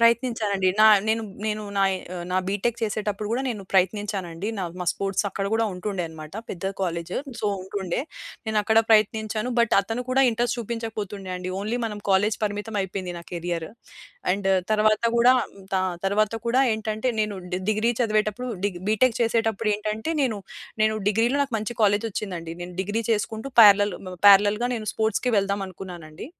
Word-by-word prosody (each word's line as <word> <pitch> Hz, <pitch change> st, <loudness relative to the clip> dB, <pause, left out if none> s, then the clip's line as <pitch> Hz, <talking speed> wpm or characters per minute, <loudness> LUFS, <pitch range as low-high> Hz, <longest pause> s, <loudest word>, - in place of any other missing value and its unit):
ప్రయత్నించానండి. 230 Hz, -5 st, +2 dB
నా -, -, +8 dB, 0.2 s
నేను 225 Hz, +1 st, +1 dB, 0.2 s
నేను 215 Hz, 0 st, -2 dB
నాయి 195 Hz, -1 st, +3 dB, 0.2 s
ఆహ్, 175 Hz, -, -5 dB
నా 185 Hz, -, +1 dB
బీ‌టెక్ 215 Hz, +4 st, -1 dB
చేసేటప్పుడు 210 Hz, -1 st, -2 dB
గూడా 250 Hz, +3 st, 0 dB
నేను 210 Hz, -5 st, -4 dB
ప్రయత్నించానండి. 190 Hz, -1 st, 0 dB
నా -, -, -2 dB, 0.2 s
మా -, -, -2 dB
స్పోర్ట్స్ 195 Hz, +1 st, -1 dB
అక్కడ 195 Hz, 0 st, -4 dB
గూడా 225 Hz, -, +2 dB
ఉంటుండే 185 Hz, +1 st, -3 dB
అన్నమాట. 155 Hz, -1 st, -10 dB, 0.2 s
పెద్ద 185 Hz, +1 st, -7 dB, 0.2 s
కాలేజీ 170 Hz, -1 st, -2 dB, 0.2 s
సో, -, -, 0 dB, 0.2 s
ఉంటుండే. 190 Hz, -2 st, -3 dB, 0.5 s
నేను 220 Hz, -1 st, +1 dB
అక్కడ 220 Hz, +1 st, +3 dB
ప్రయత్నించాను 215 Hz, +2 st, +2 dB
బట్ 235 Hz, -1 st, +3 dB
అతను 225 Hz, +5 st, -4 dB
కూడా 265 Hz, +1 st, +4 dB
ఇంట్రెస్ట్ 240 Hz, +1 st, 0 dB
చూపించకపోతుండే 215 Hz, -4 st, -5 dB
అండి. 180 Hz, 0 st, -5 dB
ఓన్లీ 220 Hz, +4 st, -2 dB
మనం 210 Hz, -2 st, -4 dB
కాలేజీ 200 Hz, +2 st, +3 dB
పరిమితమైపోయింది 200 Hz, -3 st, -3 dB
నా -, -, -9 dB
కేరియర్. 170 Hz, -1 st, -3 dB, 0.6 s
అండ్ 195 Hz, 0 st, -1 dB, 0.2 s
తర్వాత 215 Hz, +1 st, +3 dB
గూడా 240 Hz, +2 st, +6 dB, 0.4 s
త -, -, +1 dB, 0.3 s
తర్వాత 210 Hz, +2 st, +1 dB
కూడా 245 Hz, +3 st, +3 dB
ఏంటంటే 220 Hz, +2 st, -2 dB
నేను 210 Hz, -1 st, -1 dB, 0.2 s
ది 180 Hz, -, 0 dB
డిగ్రీ 215 Hz, +2 st, +2 dB
చదివేటప్పుడు 215 Hz, +1 st, 0 dB, 0.2 s
డి 205 Hz, -, +2 dB, 0.2 s
బీటెక్ 225 Hz, +3 st, +3 dB
చేసేటప్పుడేంటంటే 220 Hz, 0 st, 0 dB
నేను 230 Hz, -5 st, 0 dB, 0.5 s
నేను 215 Hz, 0 st, +3 dB
డిగ్రీలో 230 Hz, +6 st, +2 dB
నాకు 270 Hz, -5 st, -4 dB
మంచి 215 Hz, +3 st, -4 dB
కాలేజీ 205 Hz, +1 st, +3 dB
ఒచ్చిందండి. 175 Hz, -5 st, -4 dB
నేను 180 Hz, +1 st, -7 dB
డిగ్రీ 205 Hz, +4 st, -2 dB
చేసుకుంటూ 220 Hz, +3 st, -1 dB
పారలెల్ 205 Hz, -1 st, +7 dB
మ 185 Hz, -, -6 dB
పారలెల్‌గా 205 Hz, +4 st, +6 dB
నేను 215 Hz, -2 st, -5 dB
స్పోర్ట్స్‌కి 220 Hz, +3 st, 0 dB
వెళ్దాం 200 Hz, 0 st, 0 dB
అనుకున్నానండి. 175 Hz, -3 st, -9 dB
210 Hz, 155 wpm, -25 LUFS, 195-225 Hz, 0.6 s, నా